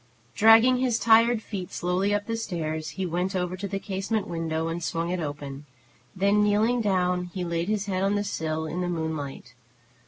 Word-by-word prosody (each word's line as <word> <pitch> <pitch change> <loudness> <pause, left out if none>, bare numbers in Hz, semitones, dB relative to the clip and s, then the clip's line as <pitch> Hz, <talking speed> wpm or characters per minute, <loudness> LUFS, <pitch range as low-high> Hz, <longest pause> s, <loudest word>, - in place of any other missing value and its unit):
Dragging 225 +4 +6
his 250 -3 +1
tired 230 0 +4
feet 190 -4 -6
slowly 180 +3 0
up 205 0 0
the 230 - -2
stairs, 160 -8 -3
he 190 - -1
went 180 +3 -2
over 180 0 -1
to 200 +2 -5
the 195 - -3
casement 195 +2 -2
window, 165 -1 -2
and 165 +1 -4
swung 165 +1 -2
it 180 - -1
open; 145 -2 -6 0.5
then, 200 +2 +3
kneeling 215 +4 +2
down, 180 -3 +1
he 185 - -2
laid 170 0 -2
his 210 -2 0
head 190 -2 -2
on 195 +1 +1
the 205 - 0
sill, 160 -5 -3
in 170 +3 -3
the 180 - -1
moonlight. 160 -7 -4
185 Hz, 190 wpm, -26 LUFS, 165-205 Hz, 0.5 s, Dragging